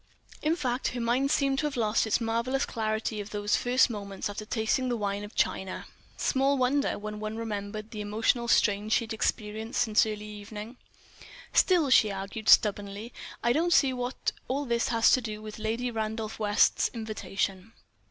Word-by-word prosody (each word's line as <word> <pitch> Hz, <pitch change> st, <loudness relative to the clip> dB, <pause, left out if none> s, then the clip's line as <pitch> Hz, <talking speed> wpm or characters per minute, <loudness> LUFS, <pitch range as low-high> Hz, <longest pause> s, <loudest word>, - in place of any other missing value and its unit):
In 310 Hz, +2 st, +1 dB
fact, 255 Hz, -5 st, -1 dB
her -, -, -2 dB
mind 245 Hz, +4 st, +1 dB
seemed 275 Hz, -2 st, +2 dB
to 300 Hz, -, +1 dB
have 285 Hz, -, -5 dB
lost 220 Hz, -1 st, +1 dB
its 220 Hz, -, +2 dB
marvellous 235 Hz, +4 st, 0 dB
clarity 220 Hz, -1 st, -2 dB
of 205 Hz, -, -8 dB
those 205 Hz, 0 st, 0 dB
first 250 Hz, +1 st, +3 dB
moments 200 Hz, -3 st, -5 dB
after 215 Hz, +1 st, -6 dB
tasting 225 Hz, +4 st, 0 dB
the 240 Hz, -, 0 dB
wine 200 Hz, -1 st, -2 dB
of 205 Hz, -, -10 dB
China. 190 Hz, -1 st, -1 dB, 0.3 s
Small 275 Hz, +1 st, +2 dB
wonder, 270 Hz, +3 st, +1 dB
when 210 Hz, 0 st, -6 dB
one 215 Hz, +1 st, -4 dB
remembered 215 Hz, -1 st, -5 dB
the 215 Hz, -, -5 dB
emotional 225 Hz, +3 st, 0 dB
strain 210 Hz, -2 st, +2 dB
she 220 Hz, -, +3 dB
had 225 Hz, 0 st, -5 dB
experienced 220 Hz, +1 st, -2 dB
since 215 Hz, -2 st, +4 dB
early 210 Hz, -1 st, -5 dB
evening! 210 Hz, +3 st, -8 dB, 0.8 s
"Still," 340 Hz, -7 st, +4 dB
she 220 Hz, -4 st, +6 dB
argued, 195 Hz, +3 st, -4 dB
stubbornly, 205 Hz, +2 st, +3 dB, 0.3 s
"I 235 Hz, -, +3 dB
don't 340 Hz, +4 st, +2 dB
see 270 Hz, -4 st, +4 dB
what 250 Hz, 0 st, -2 dB, 0.2 s
all 280 Hz, +3 st, -1 dB
this 235 Hz, -2 st, 0 dB
has 230 Hz, -1 st, +4 dB
to 255 Hz, -, +4 dB
do 215 Hz, -2 st, -5 dB
with 215 Hz, 0 st, -9 dB
Lady 230 Hz, +3 st, -2 dB
Randolph 220 Hz, -1 st, -4 dB
West's 205 Hz, -1 st, +3 dB
invitation." 200 Hz, -2 st, -3 dB
220 Hz, 175 wpm, -28 LUFS, 210-245 Hz, 0.8 s, she